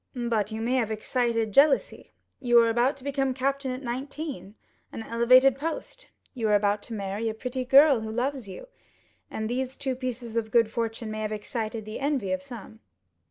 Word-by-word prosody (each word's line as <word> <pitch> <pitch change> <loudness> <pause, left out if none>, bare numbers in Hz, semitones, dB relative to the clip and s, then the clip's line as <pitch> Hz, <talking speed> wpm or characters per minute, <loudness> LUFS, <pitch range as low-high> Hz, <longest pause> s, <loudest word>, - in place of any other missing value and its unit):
"But 230 -4 -1
you 220 0 -4
may 245 +3 +1
have 230 -4 0
excited 230 0 -1
jealousy. 280 +6 +3 0.3
You 240 -1 +3
are 230 0 +2
about 240 +4 +1
to 265 - -15
become 270 -2 -1
captain 275 +1 -1
at 255 +2 -5
nineteen—an 260 -4 -7
elevated 255 +4 +5
post; 415 - -5 0.2
you 235 -5 -2
are 210 - +4
about 205 0 +1
to 230 - -6
marry 200 +2 -3
a 220 - -5
pretty 250 +3 -4
girl, 275 +1 +6
who 220 0 -6
loves 250 -1 -2
you; 190 - -9 0.6
and 220 - -4
these 255 +2 -3
two 265 -2 -2
pieces 245 -2 -5
of 225 -1 -1
good 230 -1 +3
fortune 225 -1 -3
may 215 0 -4
have 215 0 -3
excited 220 +1 -4
the 215 +1 -6
envy 275 -9 -1
of 185 - -1
someone." 235 -5 -11
240 Hz, 185 wpm, -26 LUFS, 220-265 Hz, 0.6 s, girl